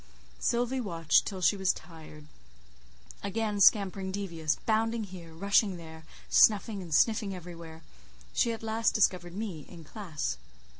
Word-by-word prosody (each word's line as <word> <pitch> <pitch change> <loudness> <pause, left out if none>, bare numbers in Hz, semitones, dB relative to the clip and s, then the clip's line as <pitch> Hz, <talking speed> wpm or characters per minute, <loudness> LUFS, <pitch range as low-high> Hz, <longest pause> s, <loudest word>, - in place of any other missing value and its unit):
Sylvie 245 +2 0
watched 165 -7 +2
till 190 -3 -5
she 160 +2 +4
was 190 -1 +2
tired. 160 -2 -12 1.0
Again 210 +1 -2
scampering 195 -2 +4
devious, 170 -6 -2
bounding 225 +1 +1
here, 180 -4 -10
rushing 200 +3 +2
there, 160 -1 -11 0.2
snuffing 210 -1 +4
and 175 -3 -9
sniffing 210 - +2
everywhere; 165 -2 -10 0.5
she 235 - +2
at 225 -1 -6
last 225 +1 0
discovered 180 -4 +1
me 195 -8 -5
in 170 -2 -11
classe. 160 - -4
190 Hz, 135 wpm, -29 LUFS, 165-215 Hz, 1.0 s, she